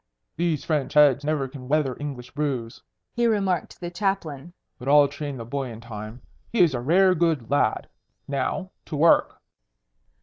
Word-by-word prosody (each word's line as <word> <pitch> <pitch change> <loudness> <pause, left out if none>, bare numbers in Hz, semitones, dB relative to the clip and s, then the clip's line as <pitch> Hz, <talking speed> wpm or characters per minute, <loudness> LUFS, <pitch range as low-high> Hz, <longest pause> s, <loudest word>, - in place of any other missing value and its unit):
"These 165 -3 -1
French 150 -3 -1
heads 145 -1 +6
never 145 -2 0
can 130 -1 -10
weather 140 -3 +1
English 135 -4 -6
brews," 135 -6 -3 0.3
he 240 -1 +2
remarked 195 -5 0
to - - -25
the 175 -1 -5
Chaplain. 175 -5 -2 0.3
"But 125 - -8
I'll 145 0 +6
train 145 -1 -6
the 115 - -7
boy 135 +2 -3
in 115 -1 -9
time. 110 +1 -9 0.3
He 230 - +2
is 165 -5 +5
a 125 - -1
rare 185 +8 +4
good 160 -8 0
lad. 125 -6 +1 0.4
Now, 140 +7 -2
to 155 - -6
work." 160 +3 +3
145 Hz, 170 wpm, -25 LUFS, 130-170 Hz, 0.4 s, heads